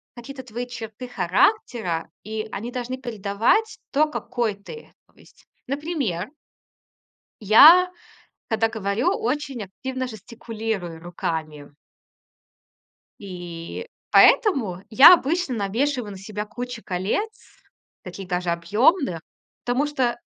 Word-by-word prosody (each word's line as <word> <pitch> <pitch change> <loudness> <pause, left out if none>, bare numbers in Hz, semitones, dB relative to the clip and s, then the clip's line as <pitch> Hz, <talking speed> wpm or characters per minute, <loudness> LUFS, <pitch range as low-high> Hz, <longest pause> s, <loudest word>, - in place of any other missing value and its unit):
какие-то 260 +2 -9
твои 240 0 -6
черты 235 0 -8
характера, 185 - 0
и 215 +1 -5
они 230 +5 -5
должны 250 0 -4
передавать 235 - 0
то, 305 +2 +2
какой 235 -6 -2
ты. 330 - -12
То - - -29
есть, - - -22 0.2
например... 275 - -3 1.1
я, 310 - +8 0.6
когда 225 0 +2
говорю, 215 +1 -1
очень 265 -1 -3
активно 260 +7 -5
жестикулирую 220 -5 -6
руками. 155 -4 -5 1.4
И 175 - -8 0.2
поэтому 235 - +4
я 265 +10 +10
обычно 330 -3 0
навешиваю 225 +3 -1
на 195 - -9
себя 210 +2 -6
кучу 240 +1 -7
колец, 210 - -4 0.4
таких 185 +1 -8
даже 180 -1 -2
объёмных, 205 - +1 0.4
потому 255 +4 +1
что 255 -5 -1
225 Hz, 105 wpm, -23 LUFS, 195-265 Hz, 1.4 s, я